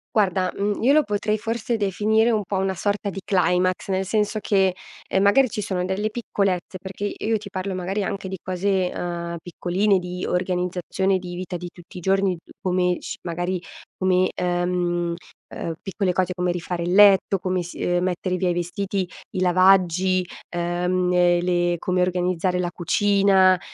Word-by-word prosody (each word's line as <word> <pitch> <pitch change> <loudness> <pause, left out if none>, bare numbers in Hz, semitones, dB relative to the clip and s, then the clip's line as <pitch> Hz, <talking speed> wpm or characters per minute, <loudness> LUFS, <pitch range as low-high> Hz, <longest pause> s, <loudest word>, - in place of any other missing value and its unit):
Guarda, 185 -3 +2
mhmm, 205 +1 -1
io 265 +5 +4
lo 305 0 +5
potrei 210 0 -1
forse 230 +1 -2
definire 215 +3 +2
un 215 -2 +1
po' 195 - -4
una 190 0 0
sorta 205 +2 -1
di 195 0 -6
climax 185 0 +1
nel 190 0 0
senso 215 +2 0
che, 195 -3 +2 0.4
ehm, 190 - +2
magari 255 +6 +5
ci 210 -2 -3
sono 185 -2 -2
delle 195 +3 -1
piccolezze 195 -5 -2
perché 195 +1 -7
i - - -3
io 225 -1 +2
ti 200 -1 -9
parlo 190 +1 -4
magari 190 +3 -2
anche 195 0 -4
di 190 - -4
cose, 185 0 0
ehm, 170 -1 -4
piccoline 185 +3 +1
di 180 0 -5
organizzazione 180 +1 0
di 175 -1 -7
vita 180 0 -4
di 175 0 -7
tutti 180 0 -14
i - - -4
giorni 195 0 +2
d 165 - -18
come 180 -1 +1
sci - - -6
magari 175 +1 -2 0.4
come, 185 0 +2
ehm, 175 -1 0 0.4
uhm, 165 - -3
piccole 195 -1 -1
cose 185 0 0
come 180 0 0
rifare 175 0 -3
il 175 +1 -1
letto, 195 -1 +6
come 185 0 -1
s 175 - -9
ehm, 175 0 0
mettere 185 0 -1
via 180 0 0
i - - +1
vestiti, 185 +2 -2 0.2
i 185 - -3
lavaggi, 185 0 +4 0.2
ehm, 180 +1 0
e 175 -1 +4
le 175 -1 +1
come 180 0 0
organizzare 180 0 0
la 175 -1 -1
cucina, 190 +1 +3
185 Hz, 175 wpm, -23 LUFS, 180-195 Hz, 0.4 s, letto